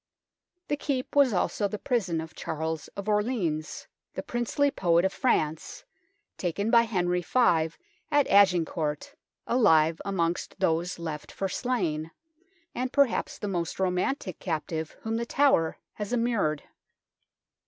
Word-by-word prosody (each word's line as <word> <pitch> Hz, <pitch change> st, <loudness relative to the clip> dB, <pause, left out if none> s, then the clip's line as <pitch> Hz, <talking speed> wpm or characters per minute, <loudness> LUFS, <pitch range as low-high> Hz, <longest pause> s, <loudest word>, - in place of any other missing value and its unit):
The 290 Hz, -, 0 dB
Keep 275 Hz, -3 st, -3 dB
was 280 Hz, -3 st, +5 dB
also 200 Hz, +1 st, 0 dB
the 210 Hz, -, -5 dB
prison 195 Hz, -10 st, -1 dB
of 160 Hz, 0 st, -9 dB
Charles 160 Hz, 0 st, -4 dB
of 200 Hz, +1 st, -5 dB
Orleans, 210 Hz, -8 st, -1 dB, 0.3 s
the -, -, -4 dB
princely 240 Hz, +4 st, 0 dB
poet 170 Hz, -4 st, +2 dB
of 190 Hz, -, 0 dB
France, 160 Hz, -, -1 dB, 0.5 s
taken 200 Hz, +5 st, -1 dB
by 235 Hz, -, +7 dB
Henry 180 Hz, -3 st, +1 dB
V 165 Hz, -6 st, +2 dB, 0.3 s
at 290 Hz, -2 st, +3 dB
Agincourt, 170 Hz, -6 st, +2 dB, 0.3 s
alive 165 Hz, -9 st, +4 dB
amongst 175 Hz, -4 st, -1 dB
those 170 Hz, +2 st, 0 dB
left 160 Hz, -3 st, -6 dB
for 195 Hz, -, -2 dB
slain, 170 Hz, -10 st, -1 dB, 0.6 s
and 255 Hz, +1 st, -2 dB
perhaps 280 Hz, -5 st, +1 dB
the 205 Hz, -, -4 dB
most 175 Hz, -3 st, -3 dB
romantic 185 Hz, -, -1 dB
captive 160 Hz, -2 st, -3 dB
whom 225 Hz, 0 st, -2 dB
The 235 Hz, -, -2 dB
Tower 270 Hz, -, +3 dB, 0.2 s
has 210 Hz, 0 st, -5 dB
immured. 230 Hz, -11 st, 0 dB
190 Hz, 130 wpm, -27 LUFS, 160-235 Hz, 0.6 s, by